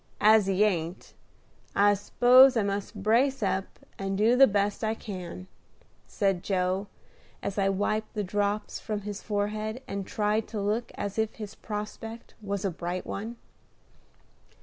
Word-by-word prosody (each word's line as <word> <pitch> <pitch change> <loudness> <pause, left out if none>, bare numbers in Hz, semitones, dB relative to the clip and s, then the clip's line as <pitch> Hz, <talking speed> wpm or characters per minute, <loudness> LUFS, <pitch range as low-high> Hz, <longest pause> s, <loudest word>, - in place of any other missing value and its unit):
As 215 -1 +6
he 195 +1 +3
ain't, 175 -4 -1 0.6
I 205 0 +5
s'pose 250 +5 +6
I 220 - +3
must 200 0 -3
brace 240 +4 +3
up, 190 -1 0 0.3
and 195 0 -2
do 225 +4 +4
the 270 +1 +8
best 205 +1 0
I 220 0 0
can," 185 -4 -7 0.6
said 195 -4 0
Joe, 185 +1 0 0.6
as 200 +1 -2
I 195 0 +3
wiped 215 +3 -1
the 210 - -1
drops 205 +2 -1
from 210 -1 -4
his 205 0 -6
forehead, 215 +3 -2
and 195 -1 -4
tried 210 +1 0
to 220 - -5
look 215 +4 -1
as 200 +1 -4
if 220 -1 0
his 210 -2 -7
prospect 220 +2 -7
was 200 -1 -3
a 195 - +1
bright 175 +2 -4
one. 225 +4 -5
205 Hz, 150 wpm, -28 LUFS, 195-220 Hz, 0.6 s, the